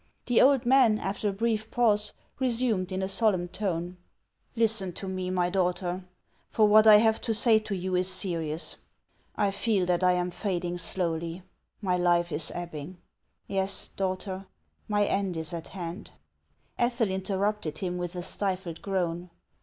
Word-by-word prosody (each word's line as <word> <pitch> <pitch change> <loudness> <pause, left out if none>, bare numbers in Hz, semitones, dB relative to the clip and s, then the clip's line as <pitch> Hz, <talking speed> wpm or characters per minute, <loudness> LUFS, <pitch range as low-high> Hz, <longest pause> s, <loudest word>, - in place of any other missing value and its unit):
The 245 -2 +4
old 270 -2 +5
man, 245 -4 +5
after 205 +1 -2
a - - -1
brief 220 +1 -1
pause, 210 -4 +2 0.3
resumed 230 -7 +1
in 190 +1 -2
a - - 0
solemn 190 -3 +2
tone: 180 -2 -3 0.3
" - - -44
Listen 220 -5 +2
to 195 - -7
me, 185 -1 -3
my 180 -1 0
daughter; 180 -1 -1 0.5
for 215 -1 +3
what 215 +1 +6
I 215 - +10
have 220 +1 +3
to 225 -2 -1
say 220 0 +4
to 215 -2 -4
you 185 0 -3
is 185 +1 +3
serious. 170 -4 -1 0.6
I 205 -2 +1
feel 200 -1 0
that 180 0 +1
I 180 0 +5
am 180 0 -1
fading 175 -2 -2
slowly; 170 0 -1 0.4
my 180 -2 +1
life 175 -1 +2
is 150 +1 -3
ebbing. 175 0 -6 0.5
Yes, 195 0 -1
daughter, 190 0 -4 0.4
my 205 -1 +2
end 195 -4 -1
is 160 +1 -2
at 165 -1 -5
hand." 175 0 -7 0.7
Ethel 240 -3 +1
interrupted 190 -3 -2
him 180 0 -3
with 175 0 -4
a 175 - -4
stifled 185 -3 -3
groan. 180 -2 -2
190 Hz, 160 wpm, -28 LUFS, 175-210 Hz, 0.7 s, I